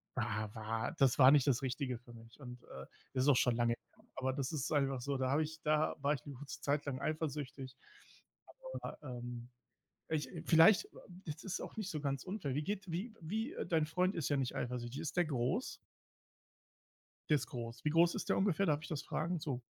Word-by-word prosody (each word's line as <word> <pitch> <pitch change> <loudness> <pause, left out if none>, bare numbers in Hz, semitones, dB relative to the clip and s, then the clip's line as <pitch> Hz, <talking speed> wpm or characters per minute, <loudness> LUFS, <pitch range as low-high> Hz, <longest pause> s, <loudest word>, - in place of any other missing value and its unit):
wa 110 0 -1
wa 110 +1 -2
das 135 -3 +5
war 130 +1 +10
nicht 145 -2 +5
das 130 -3 +3
Richtige 130 -1 -2
für 120 +1 -16
mich 115 +3 -14
und, 125 -2 -8
äh, 65 0 -9 0.3
ist 130 +2 +2
auch 140 - +7
schon 120 -2 +3
lange 120 0 +2
her. 215 - -28
Aber 130 0 0
das 135 0 -2
ist 150 -5 -2
einfach 135 -3 +2
so, 140 +2 -1
da 130 0 0
habe 145 +3 +3
ich 160 +1 -7
da 155 0 +2
war 145 +1 +3
ich 140 - -3
'ne 145 - -6
kurze 140 +3 -8
Zeit 145 +1 +1
lang 135 -2 -2
eifersüchtig. 140 -4 -3 1.1
Aber, - - -6
ja, 130 -4 -6
ähm. 120 0 -6 0.6
Ich, 155 -2 -1
äh 165 -3 -7
vielleicht 185 - +7 0.4
ist 150 -1 -6
das 195 - -3
auch - - -7
nicht 205 -3 -3
so 155 - -3
ganz 140 -2 -1
unfair. 180 -9 -3
Wie 150 - +1
geht's 195 -2 -3
wie 210 +7 -3
wie, 220 - -2
äh - - -3
dein 160 -3 +2
Freund 180 +4 +1
ist 165 -5 -1
ja 145 - +2
nicht 130 -2 -1
eifersüchtig. 125 +2 -3
Ist 165 +2 -4
der 175 - +4
groß? 130 - -1 1.5
Der 150 - +6
ist 140 - -1
groß. 115 -1 -6
Wie 150 - +2
groß 170 +2 +5
ist - - -4
der - - +3
ungefähr? 195 0 +2
Darf 150 -1 +2
ich - - -6
das 155 -3 -3
fragen, 170 +2 -2
so? 140 -5 -2
145 Hz, 220 wpm, -35 LUFS, 125-160 Hz, 1.5 s, war